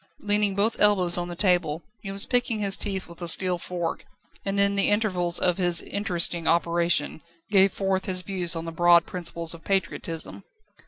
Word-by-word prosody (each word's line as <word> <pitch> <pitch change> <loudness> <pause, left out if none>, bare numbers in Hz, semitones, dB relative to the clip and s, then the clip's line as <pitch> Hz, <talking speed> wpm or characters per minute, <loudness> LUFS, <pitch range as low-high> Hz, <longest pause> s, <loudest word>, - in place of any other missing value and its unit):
Leaning 205 -1 +2
both 210 +3 0
elbows 190 -4 +3
on 175 0 0
the 175 - -7
table, 175 -4 0 0.2
he 195 - -8
was 195 0 +4
picking 245 -3 0
his 200 -2 +1
teeth 195 -2 -3
with 170 +1 -13
a 175 - -4
steel 180 +1 +4
fork, 175 -1 -4 0.4
and 200 0 -2
in 200 0 +3
the 200 0 +3
intervals 185 -5 0
of 180 0 +1
his 175 -2 +2
interesting 175 -4 -1
operation, 170 -2 0 0.3
gave 195 -1 +5
forth 195 0 -2
his 185 -1 -2
views 180 -4 -1
on 165 0 -5
the 165 - -6
broad 170 +1 +4
principles 170 -2 -4
of 165 - -13
patriotism. 170 -4 -4
180 Hz, 180 wpm, -24 LUFS, 170-200 Hz, 0.4 s, gave